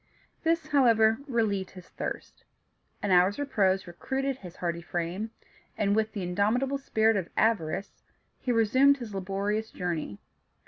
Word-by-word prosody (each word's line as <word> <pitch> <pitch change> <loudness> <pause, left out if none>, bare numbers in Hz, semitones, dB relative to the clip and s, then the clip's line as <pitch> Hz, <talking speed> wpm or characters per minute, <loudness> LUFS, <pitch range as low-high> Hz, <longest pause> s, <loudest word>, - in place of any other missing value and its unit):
This, 330 0 +1
however, 225 -5 +4
relieved 215 -7 0
his 185 -2 -13
thirst; - - -6 0.6
an 205 - 0
hour's 180 +2 +4
repose 200 -9 +1
recruited 265 +10 -3
his 180 -7 -11
hardy 170 -1 -3
frame, 175 +6 -3 0.5
and, 200 -1 +2
with 220 0 0
the 200 - -4
indomitable 220 +10 +1
spirit 225 -4 +2
of 190 -4 -2
avarice, 200 -4 0 0.4
he 250 - -1
resumed 260 +5 +4
his 235 -5 -7
laborious 200 +3 -2
journey. 165 - -4
210 Hz, 135 wpm, -28 LUFS, 185-235 Hz, 0.6 s, however